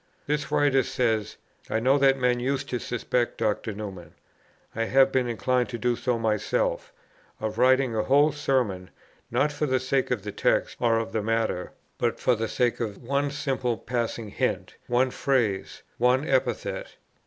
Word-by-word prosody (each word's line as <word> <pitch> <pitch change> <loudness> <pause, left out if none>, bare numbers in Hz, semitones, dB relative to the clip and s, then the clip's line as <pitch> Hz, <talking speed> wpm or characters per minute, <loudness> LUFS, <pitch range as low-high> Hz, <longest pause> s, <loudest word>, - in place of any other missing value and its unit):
This 150 0 -2
writer 140 -2 +3
says, 110 -4 -1 0.3
"I 110 - +1
know 130 +4 +3
that 135 -1 +4
men 125 -1 +1
used 135 +2 -1
to 125 - -2
suspect 120 0 -1
Dr. 110 +1 -1
Newman, 95 -5 -8 0.6
I 115 +1 0
have 135 +2 +4
been 130 -2 +1
inclined 125 +1 0
to 120 - -4
do 120 +1 +1
so 125 0 -1
myself, 470 - -1 0.5
of 110 +1 -3
writing 130 -1 +4
a 110 - +2
whole 145 +6 +4
Sermon, 125 -11 -1 0.4
not 150 - +1
for 150 +1 -2
the 130 -1 +2
sake 130 +1 0
of 120 -6 -1
the 105 - -4
text - - +1
or 115 -2 +3
of 115 0 -2
the 110 - -1
matter, 110 -4 -1 0.3
but 120 -1 0
for 125 - +3
the 115 -1 -1
sake 120 +1 0
of 110 -1 -4
one 140 +3 0
simple 135 -4 -1
passing 115 -2 -3
hint, - - -2
one 125 +2 +2
phrase, 120 -10 -1 0.2
one 125 +4 +3
epithet." 130 -1 -1
125 Hz, 170 wpm, -26 LUFS, 115-135 Hz, 0.6 s, that